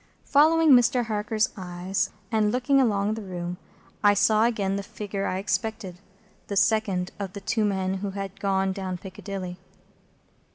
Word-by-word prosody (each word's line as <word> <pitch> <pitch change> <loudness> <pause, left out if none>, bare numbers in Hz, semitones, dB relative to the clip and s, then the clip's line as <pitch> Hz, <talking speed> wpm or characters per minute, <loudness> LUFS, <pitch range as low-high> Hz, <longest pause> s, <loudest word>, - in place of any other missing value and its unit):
Following 315 +2 +5
Mr. 245 -1 +5
Harker's 215 +1 0
eyes, 185 0 -2 0.2
and 215 -2 +2
looking 270 +3 +3
along 210 -3 +1
the 220 - -5
room, 180 -2 -5 0.5
I 205 0 +6
saw 215 +2 +4
again 200 -5 0
the 200 - -2
figure 200 0 -4
I 185 - -1
expected,—the 195 -1 -5
second 200 -3 +1
of 195 -2 -5
the 200 - -7
two 220 +2 0
men 190 -2 0
who 200 +1 -3
had 195 -1 -6
gone 195 -1 +1
down 190 -2 -4
Piccadilly. 185 -1 -7
200 Hz, 150 wpm, -26 LUFS, 190-220 Hz, 0.5 s, I